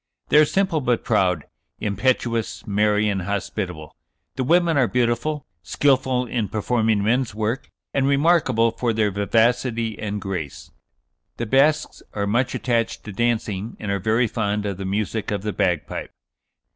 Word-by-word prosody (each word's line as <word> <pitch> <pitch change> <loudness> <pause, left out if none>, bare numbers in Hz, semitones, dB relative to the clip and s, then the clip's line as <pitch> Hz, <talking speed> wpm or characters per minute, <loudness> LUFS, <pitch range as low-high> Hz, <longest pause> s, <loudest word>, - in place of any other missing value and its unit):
They 150 - +6
are 155 - +7
simple 185 -1 +1
but 125 -2 0
proud, 90 -8 +1 0.3
impetuous, 115 +2 -1
merry, 105 +1 +2
and 100 -2 0
hospitable. 90 -4 -4 0.4
The 130 - -1
women 170 +4 +3
are 130 -4 +3
beautiful, 125 +5 0 0.2
skilful 130 - +1
in 115 -3 -2
performing 110 -1 +1
men's 115 0 +1
work, 110 +4 -2 0.2
and 135 -1 +2
remarkable 140 -6 +3
for 115 0 -1
their 105 -2 +1
vivacity 115 +2 +1
and 105 -1 -3
grace. 90 -8 -5 0.7
The 120 - -2
Basques 145 +6 +2
are 100 -1 -1
much 120 +5 0
attached 115 -2 -1
to 105 - -7
dancing, 110 -1 -1
and 105 - -3
are 100 - 0
very 110 +5 +2
fond 105 -2 -1
of 100 -3 -3
the 95 - -5
music 105 +2 -2
of 100 -2 -2
the 105 -1 -2
bagpipe." 90 -6 -1
110 Hz, 150 wpm, -23 LUFS, 100-125 Hz, 0.7 s, are